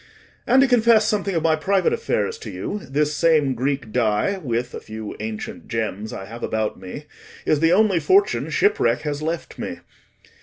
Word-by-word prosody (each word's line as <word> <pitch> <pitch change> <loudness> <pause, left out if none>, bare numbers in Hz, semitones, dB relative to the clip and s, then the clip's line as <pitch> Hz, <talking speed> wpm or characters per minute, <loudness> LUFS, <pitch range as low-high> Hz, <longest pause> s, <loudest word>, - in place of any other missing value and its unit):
And, 260 +2 +6
to - - +4
confess 230 -3 +4
something 205 -4 0
of 165 - 0
my 160 -1 +4
private 190 - +1
affairs 460 0 -1
to - - -8
you, 210 - -4
this 150 +2 +1
same 150 -4 +3
Greek 130 -1 -2
dye, 120 - +1
with 120 -5 -2
a - - -5
few 110 -1 -7
ancient 110 0 -6
gems 110 -2 -3
I 95 - -6
have 115 +3 -9
about 110 -3 -2
me, 95 +11 -8 0.4
is 155 - +2
the 165 +2 +4
only 200 -3 +4
fortune 395 - +2
shipwreck 415 +1 +2
has 150 -1 -3
left 165 +2 -4
me. - - -5
155 Hz, 180 wpm, -22 LUFS, -, 0.4 s, And